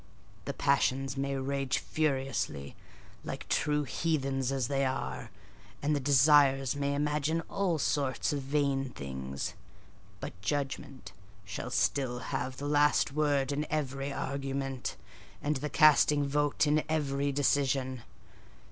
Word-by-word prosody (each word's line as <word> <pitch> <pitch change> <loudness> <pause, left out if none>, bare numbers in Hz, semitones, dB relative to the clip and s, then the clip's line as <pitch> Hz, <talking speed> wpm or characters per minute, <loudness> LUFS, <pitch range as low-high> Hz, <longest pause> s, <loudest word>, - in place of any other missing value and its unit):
The - - -3
passions 135 -1 +1
may 140 0 -1
rage 135 0 -1
furiously, 130 - -2 0.5
like - - -6
true 150 0 +1
heathens, 135 -2 -1
as 135 -3 0
they 140 0 0
are; 130 0 -3 0.5
and 150 +1 +2
the - - +1
desires 135 -1 +5
may 140 0 -1
imagine 150 +2 0
all 180 -1 -1
sorts 140 -2 0
of 140 - -2
vain 135 -1 0
things: 65 - -5 0.7
but 95 - -8
judgment 135 +3 -3 0.3
shall 95 +6 -5
still 125 0 +1 0.2
have 130 0 -2
the 145 - -5
last 145 -1 +3
word 145 -2 +1
in 145 +2 -2
every 140 -2 -2
argument, 135 -2 -3 0.4
and 150 0 -1
the 150 +3 -3
casting 150 -1 +5
vote 145 +2 +1
in 150 +1 +2
every 140 -2 0
decision. 135 -2 +1
140 Hz, 125 wpm, -30 LUFS, 135-145 Hz, 0.7 s, desires